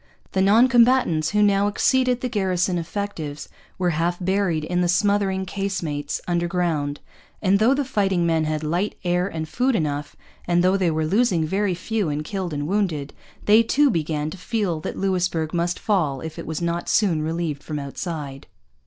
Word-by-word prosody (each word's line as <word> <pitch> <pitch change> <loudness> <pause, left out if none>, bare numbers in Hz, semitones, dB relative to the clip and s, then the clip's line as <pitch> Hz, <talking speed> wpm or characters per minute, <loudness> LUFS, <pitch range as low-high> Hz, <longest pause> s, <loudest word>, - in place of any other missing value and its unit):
The 190 - +1
non 215 +6 +5
combatants, 240 -11 +3
who 210 0 +2
now 200 0 +3
exceeded 250 +3 +2
the 255 - -1
garrison 185 -5 0
effectives, 165 -5 -5 0.3
were 180 -1 +1
half 170 +2 0
buried 185 -4 0
in 180 +3 -1
the 175 - +2
smothering 195 +1 +1
casemates 180 -7 -3
underground; 170 -4 -1 0.4
and 200 0 +2
though 240 +5 +4
the 285 0 -1
fighting 195 -8 +1
men 165 -1 +1
had 155 0 -2
light, 175 +7 -1
air, 180 +1 +1
and 160 -4 -4
food 255 +7 0
enough, 150 -5 -2 0.3
and 175 0 +3
though 185 +1 +4
they 185 -3 +2
were 160 0 0
losing 190 -2 +2
very 190 +2 0
few 205 0 -2
in 150 +1 -2
killed 185 +1 -4
and 145 0 -3
wounded, 170 -7 -1 0.3
they 215 +2 +6
too 275 +5 +3
began 155 -2 -2
to 195 - -9
feel 195 -5 -1
that - - -5
Louisbourg 180 -4 -1
must 175 0 0
fall 155 -11 0
if 160 -1 -7
it - - -7
was 160 +1 -3
not 170 0 -2
soon 180 -8 +2
relieved 160 -2 -2
from 155 - -5
outside. 140 -1 -6
180 Hz, 180 wpm, -23 LUFS, 155-200 Hz, 0.4 s, they